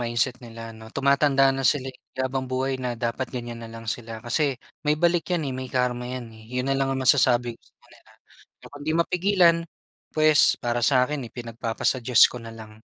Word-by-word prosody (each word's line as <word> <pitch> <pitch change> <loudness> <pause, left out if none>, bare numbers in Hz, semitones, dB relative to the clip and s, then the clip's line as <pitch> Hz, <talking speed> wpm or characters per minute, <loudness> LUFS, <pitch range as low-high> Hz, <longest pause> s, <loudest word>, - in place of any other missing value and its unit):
mindset 120 +1 -1
nila 115 -1 -9
'no, 110 0 -12
tumatanda 140 +1 +3
na 135 - -3
sila 135 -2 +1
eh. - - -20 0.2
Di - - -19
habang 130 0 -2
buhay 130 +1 -1
na 125 -2 -3
dapat 120 +2 -2
ganyan 120 -2 -6
na 115 - -8
lang 115 0 -10
sila 115 0 -5
kasi 135 +2 0 0.2
may 150 0 +1
balik 170 +1 +1
yan 175 -4 0
eh, 135 - -3
may 130 0 -5
karma 125 -1 -1
yan 125 -2 -6
eh, 110 0 -15
'yon 125 +1 -2
na 135 - +2
lang 135 0 +1
ang 135 0 -1
masasabi 120 -3 +3
ko - - -48
sa - - -37
kanila. - - -21 0.5
Kapag 145 - -12
'di 155 +2 -1
mapigilan, 180 0 +3 0.6
puwes, 155 -1 +5
para 120 0 -1
sa 125 +1 +4
akin 140 -2 -4
eh, - - -10
ipinagpapasa-Diyos 115 +1 0
ko 125 - -6
nalang. 110 -1 -11
125 Hz, 205 wpm, -25 LUFS, 120-140 Hz, 0.6 s, puwes